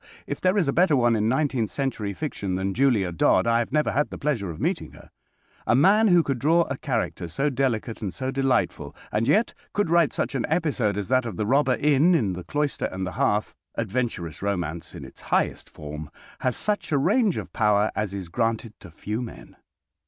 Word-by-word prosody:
If - - -5
there 185 +2 +2
is 180 -7 +2
a 140 - +1
better 175 -3 +4
one 120 -3 +3
in 110 0 +1
nineteenth 130 -4 0
century 125 -7 -2
fiction 100 -7 -4
than 95 +1 -1
Julia 115 -8 +2
Dodd 85 - +3
I 115 0 +3
have 120 - -2
never 150 +1 +1
had 145 +2 0
the - - -7
pleasure 130 -10 -1
of 80 - -7
meeting - - -2
her. - - -16 0.6
A - - +4
man 200 - +5
who 175 -4 +5
could 135 -4 -2
draw 165 +6 +4
a 135 -4 -5
character 115 -10 -2
so 140 - -1
delicate 125 -4 -1
and 100 -4 -3
so 130 +5 -3
delightful, 135 -2 0 0.2
and 110 +2 0
yet 210 +11 +3 0.2
could 205 -5 0
write 170 -3 +4
such - - -2
an 135 - -1
episode 145 - 0
as 100 -2 -3
that 130 -2 +2
of 105 -6 -6
the 105 - -1
Robber 135 +2 +3
Inn 150 +4 +4
in 105 - +1
"The 90 0 -6
Cloister 145 - -1
and 95 0 -3
the 95 - -4
Hearth," 105 +3 0 0.2
adventurous 115 -7 -3
romance 85 -5 -3
in - - -8
its - - -14
highest - - -1
form, 75 0 -8 0.3
has 130 -2 -1
such 210 -5 -1
a 145 - +3
range 205 - +2
of - - -6
power 105 -1 +2
as 105 -3 -1
is 95 -3 -5
granted 115 +2 -1
to - - -12
few 105 +8 -4
men. 120 - -9
120 Hz, 210 wpm, -25 LUFS, 100-145 Hz, 0.6 s, man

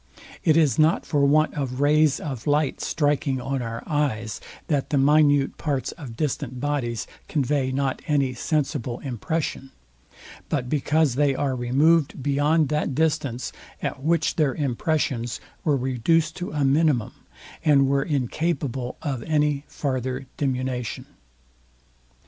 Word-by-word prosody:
It 160 -1 +4
is 150 -7 +3
not 155 +2 +3
for 145 -3 +1
want 155 +2 +3
of 135 -3 -3
rays 150 0 +4
of 135 -5 -6
light 145 -1 +1
striking 145 -3 0
on 135 +1 -2
our 115 -1 -5
eyes, 125 -8 -1 0.2
that 145 -4 -1
the 145 - +1
minute 145 0 +4
parts 140 -4 -1
of 130 -9 -10
distant 140 -4 -2
bodies 130 -5 -2 0.2
convey 140 -2 0
not 135 0 -1
any 140 -4 +1
sensible 125 -3 -1
impression; 135 +2 -3 0.8
but 135 -5 -1
because 150 0 +2
they 140 +1 +2
are 135 -1 0
removed 140 +4 +2
beyond 145 +2 +2
that 150 -2 -1
distance, 140 -5 0 0.3
at 135 - -4
which 165 +4 +1
their 150 -5 +2
impressions 135 -3 -1 0.2
were 150 -3 +2
reduced 135 +6 +1
to 180 - -4
a 145 -2 0
minimum, 140 -4 +2 0.5
and 140 -3 +5
were 140 0 +2
incapable 135 -2 -2
of 135 -6 -2
any 150 -2 +1
farther 130 -1 -3
diminution. 130 -3 -2
140 Hz, 130 wpm, -24 LUFS, 130-150 Hz, 0.8 s, and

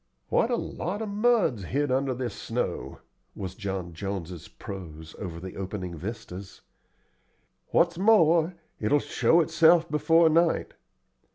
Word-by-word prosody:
"What 230 - +2
a 245 - +2
lot 205 -1 -4
of 215 - -4
mud's 205 - +2
hid 145 +6 -1
under 130 0 +1
this 125 -1 -3
snow!" 120 +2 -4 0.3
was 95 -2 -5
John 95 -4 -5
Jones's 90 -2 -5
prose 80 -5 -9
over 85 -4 -6
the 95 +1 -8
opening 95 -2 -5
vistas. 100 +1 -8 1.1
"What's 170 0 +2
more, 175 -5 +4 0.2
it 105 - -1
will 145 - +6
show 165 +3 +3
itself 165 +1 +4
before 165 +2 +4
night. 165 +1 +2
130 Hz, 130 wpm, -27 LUFS, -, 1.1 s, will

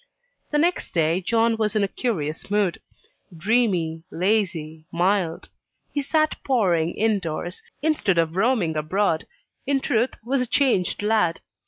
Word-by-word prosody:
The 295 - +1
next 340 - 0
day 165 +2 +2
John 225 +3 +2
was 215 -1 0
in 210 - +3
a - - +2
curious 165 - -3
mood. 205 -4 +1 0.6
Dreamy, 180 -5 +1
lazy, 170 -5 -1
mild; 180 -1 0 0.4
he 290 - 0
sat 310 +2 0
poring 175 -10 +1
in 215 -1 +2
doors, 175 +1 -5 0.2
instead 300 - +1
of 165 0 +1
roaming 195 -6 +2
abroad 160 +2 0 0.4
in 280 -1 +2
truth, 240 -1 0
was 265 +2 +1
a 250 - -1
changed 230 -8 +1
lad. 210 -6 +2
200 Hz, 140 wpm, -24 LUFS, 165-235 Hz, 0.6 s, in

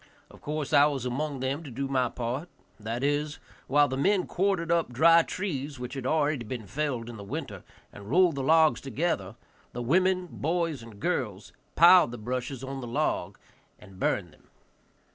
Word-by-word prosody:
Of - - -16
course 150 -1 -4
I 145 0 +7
was 135 -4 -3
among 135 +2 -3
them 135 +4 -2
to 155 - -9
do 135 +3 -3
my 130 -2 +1
part; 125 +9 -4 0.3
that 115 +4 -4
is, 145 +1 0 0.3
while 145 +1 +4
the 130 - -3
men 190 +6 +2
quartered 185 -3 0
up 170 -6 +1
dry 165 +7 +6
trees, 150 -7 -4
which 125 0 -6
had 135 -3 -5
been - - +1
already 145 -6 0
felled 125 +2 -3
in 120 -1 -8
the 100 - -8
winter, 100 - -6 0.3
and 100 0 -11
rolled 175 +3 +4
the 140 - -3
logs 160 +3 +4
together, 130 - -2 0.4
the 120 - -4
women, 185 +7 +2
boys 165 -3 -1
and 115 -3 -13
girls 110 - -3 0.2
piled 175 -2 +7
the 120 - -7
brushes 125 +3 -4
on 135 0 -5
the 120 - -6
logs 115 - -2 0.4
and 95 -3 -15
burned 90 -6 -1
them. - - -25
140 Hz, 180 wpm, -28 LUFS, 120-160 Hz, 0.4 s, I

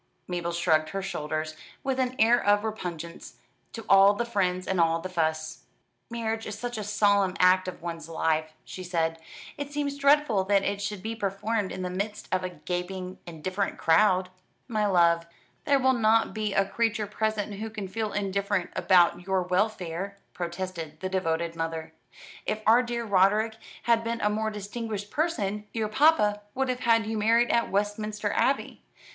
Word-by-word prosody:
Mabel 175 -1 -2
shrugged 160 -2 +2
her 195 +3 -4
shoulders, 155 -4 -3 0.3
with 265 -1 -1
an 255 0 0
air 235 +2 +4
of 205 +1 +3
repugnance 175 -6 -6 0.4
to 225 - -7
all 195 +1 +7
the 235 - -1
friends 185 -5 -1
and 190 -2 +2
all 165 0 +3
the 185 +3 -6
fuss. 160 -2 -1 0.5
"Marriage 225 -1 -3
is 210 - -5
such 245 0 -4
a - - -3
solemn 200 -2 +2
act 185 +1 +5
of 180 -2 -7
one's 165 -1 -6
life," 160 -1 0
she 185 - -8
said. 165 -2 -1 0.4
"It 285 0 -4
seems 285 -1 -2
dreadful 280 -8 +4
that 200 0 +3
it 200 +1 -1
should 200 -1 -4
be 225 +1 -3
performed 205 0 -2
in 185 - -5
the 180 - -2
midst 205 +3 -4
of 185 0 +1
a 185 - -2
gaping, 180 +1 -5
indifferent 185 +4 -3
crowd." 185 +2 +3 0.4
"My 215 -4 0
love, 170 -3 +3 0.4
there 280 - +4
will 260 0 +3
not 225 -1 +3
be 215 -1 -2
a 195 - +4
creature 225 +1 0
present 210 0 -2
who 220 +1 -4
can 210 -3 -6
feel 215 +2 -3
indifferent 200 -2 -1
about 175 -1 +3
your 190 -1 +1
welfare," 185 0 -1 0.2
protested 170 -3 -5
the 185 - -2
devoted 170 -3 -1
mother. 165 -1 -4 0.5
"If 215 0 -2
our 230 +3 +6
dear 235 -1 -3
Roderick 210 +2 +3 0.3
had 230 -1 +3
been 230 0 -2
a 210 - +2
more 220 +1 -1
distinguished 210 0 -5
person, 210 - -1
your 220 -2 -1
papa 215 -5 +4
would 265 0 0
have 250 0 -1
had 230 -3 +3
you 220 0 -2
married 230 +3 +3
in 235 0 +2
Westminster 210 +1 -1
Abbey. 275 - 0
200 Hz, 175 wpm, -27 LUFS, 180-220 Hz, 0.5 s, all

